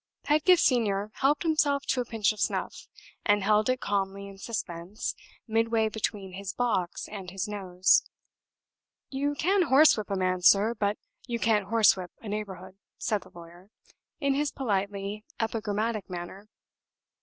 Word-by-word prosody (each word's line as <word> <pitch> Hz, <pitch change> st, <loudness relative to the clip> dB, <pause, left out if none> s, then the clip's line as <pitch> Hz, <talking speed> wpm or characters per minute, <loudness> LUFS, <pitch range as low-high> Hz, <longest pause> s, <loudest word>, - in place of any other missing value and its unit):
Pedgift 325 Hz, +4 st, +4 dB
Senior 210 Hz, -5 st, +1 dB
helped 285 Hz, +4 st, +2 dB
himself 290 Hz, -3 st, +2 dB
to 255 Hz, -, +1 dB
a -, -, -4 dB
pinch 220 Hz, -2 st, +1 dB
of 210 Hz, -, -13 dB
snuff, -, -, -2 dB, 0.4 s
and 205 Hz, -1 st, +3 dB
held 210 Hz, +3 st, +3 dB
it 255 Hz, 0 st, 0 dB
calmly 200 Hz, 0 st, -2 dB
in 195 Hz, -, -11 dB
suspense 195 Hz, -3 st, -4 dB, 0.3 s
midway 225 Hz, 0 st, +1 dB
between 205 Hz, -3 st, -3 dB
his 190 Hz, 0 st, -5 dB
box 205 Hz, -8 st, -1 dB
and 195 Hz, -3 st, -7 dB
his 190 Hz, +2 st, -3 dB
nose. 190 Hz, -3 st, +2 dB, 1.1 s
"You 285 Hz, +2 st, -1 dB
can 380 Hz, +6 st, +2 dB
horsewhip 265 Hz, -, +5 dB
a 200 Hz, -, -1 dB
man, 185 Hz, -1 st, 0 dB
sir; 200 Hz, +5 st, +5 dB
but 210 Hz, -2 st, -1 dB, 0.3 s
you 235 Hz, -2 st, -1 dB
can't 215 Hz, -4 st, +1 dB
horsewhip 195 Hz, -4 st, +3 dB
a 225 Hz, -, -10 dB
neighborhood," 190 Hz, -2 st, -6 dB, 0.2 s
said 210 Hz, -2 st, -1 dB
the -, -, -16 dB
lawyer, 175 Hz, +3 st, -14 dB, 0.5 s
in 280 Hz, -2 st, +1 dB
his 285 Hz, +1 st, 0 dB
politely 200 Hz, -3 st, -2 dB, 0.2 s
epigrammatic 220 Hz, -1 st, -2 dB
manner. 185 Hz, +4 st, -7 dB
210 Hz, 145 wpm, -28 LUFS, 195-235 Hz, 1.1 s, horsewhip